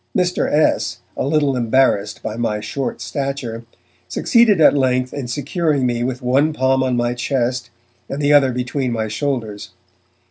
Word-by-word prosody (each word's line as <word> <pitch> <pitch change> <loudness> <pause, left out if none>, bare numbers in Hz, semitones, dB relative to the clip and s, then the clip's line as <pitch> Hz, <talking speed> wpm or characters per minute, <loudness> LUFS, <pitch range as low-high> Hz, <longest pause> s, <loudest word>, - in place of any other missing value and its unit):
Mr. 180 -1 0
S., 150 +1 +1 0.2
a - - -2
little 145 -2 +1
embarrassed 115 -4 +1
by 110 - -4
my 115 -2 -1
short 130 +5 -4
stature, 135 -5 -4 0.4
succeeded 220 - +3
at 155 - +6
length 130 -2 +1
in 140 -3 -5
securing 145 +2 -1
me 120 -1 0
with 130 +1 -3
one 140 +5 +2
palm 130 -1 +1
on 130 -2 0
my 120 0 0
chest 125 -1 -2 0.4
and 140 - -4
the 145 0 +3
other 140 -3 +5
between 125 +1 -2
my 110 -1 -2
shoulders. 110 -3 -3
130 Hz, 155 wpm, -19 LUFS, 120-145 Hz, 0.4 s, at